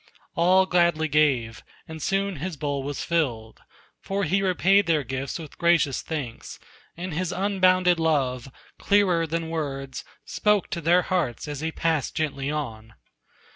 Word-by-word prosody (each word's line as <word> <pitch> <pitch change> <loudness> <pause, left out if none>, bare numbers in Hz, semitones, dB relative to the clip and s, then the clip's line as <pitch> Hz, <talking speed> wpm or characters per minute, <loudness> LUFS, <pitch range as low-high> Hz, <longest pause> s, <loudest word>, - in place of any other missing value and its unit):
All 185 +3 +4
gladly 170 -3 +2
gave, 135 -7 +1 0.3
and 160 -1 -8
soon 195 0 -1
his 165 +2 -5
bowl 140 -1 -2
was 140 +1 -4
filled, 125 -10 -2 0.4
For 200 +1 -3
he 195 +3 +1
repaid 195 +1 +3
their 155 -3 +2
gifts 135 +1 -4
with 160 -4 -11
gracious 170 -6 +2
thanks, 140 -8 -6 0.4
And 175 0 -5
his 180 +2 -2
unbounded 185 -2 +2
love, 135 -5 0 0.3
clearer 185 -5 +2
than 165 0 -3
words, 135 -4 -4 0.2
Spoke 210 -3 +1
to 170 - -3
their 175 +3 +4
hearts 170 -9 -2
as 145 -2 -5
he 160 +2 -2
passed 160 -3 -1
gently 145 -3 -2
on. 115 -7 -5
160 Hz, 145 wpm, -25 LUFS, 140-180 Hz, 0.4 s, All